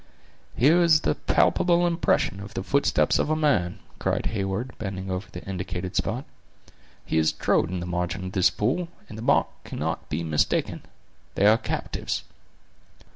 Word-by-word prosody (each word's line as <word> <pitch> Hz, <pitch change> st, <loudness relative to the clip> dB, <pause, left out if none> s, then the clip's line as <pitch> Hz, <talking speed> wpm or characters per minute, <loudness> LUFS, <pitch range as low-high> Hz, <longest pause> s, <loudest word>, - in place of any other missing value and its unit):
"Here 155 Hz, +8 st, +5 dB
is 160 Hz, -3 st, +5 dB
the -, -, +1 dB
palpable 175 Hz, -1 st, +2 dB
impression 165 Hz, -, +1 dB
of 100 Hz, +1 st, -9 dB
the 95 Hz, -, -2 dB
footstep 140 Hz, +7 st, +2 dB
of -, -, 0 dB
a 155 Hz, -, +2 dB
man," 140 Hz, -, +1 dB, 0.2 s
cried -, -, -1 dB
Heyward, 100 Hz, +5 st, -2 dB
bending 95 Hz, -2 st, -4 dB
over 95 Hz, +1 st, -3 dB
the -, -, -9 dB
indicated 95 Hz, -1 st, -5 dB
spot; 125 Hz, +5 st, -1 dB, 0.8 s
"he -, -, -1 dB
has 80 Hz, 0 st, +3 dB
trod -, -, +1 dB
in 90 Hz, -1 st, -3 dB
the -, -, -4 dB
margin 90 Hz, +1 st, -2 dB
of 95 Hz, -, -5 dB
this 95 Hz, -2 st, +4 dB
pool, 140 Hz, +12 st, -1 dB, 0.2 s
and 105 Hz, -, -8 dB
the 110 Hz, -, -7 dB
mark 120 Hz, -, +3 dB, 0.2 s
cannot -, -, -4 dB
be 80 Hz, +3 st, -2 dB
mistaken. 80 Hz, -2 st, 0 dB, 0.5 s
They 100 Hz, -, +2 dB
are 110 Hz, +2 st, +6 dB
captives." -, -, -3 dB
100 Hz, 165 wpm, -25 LUFS, 90-140 Hz, 0.8 s, are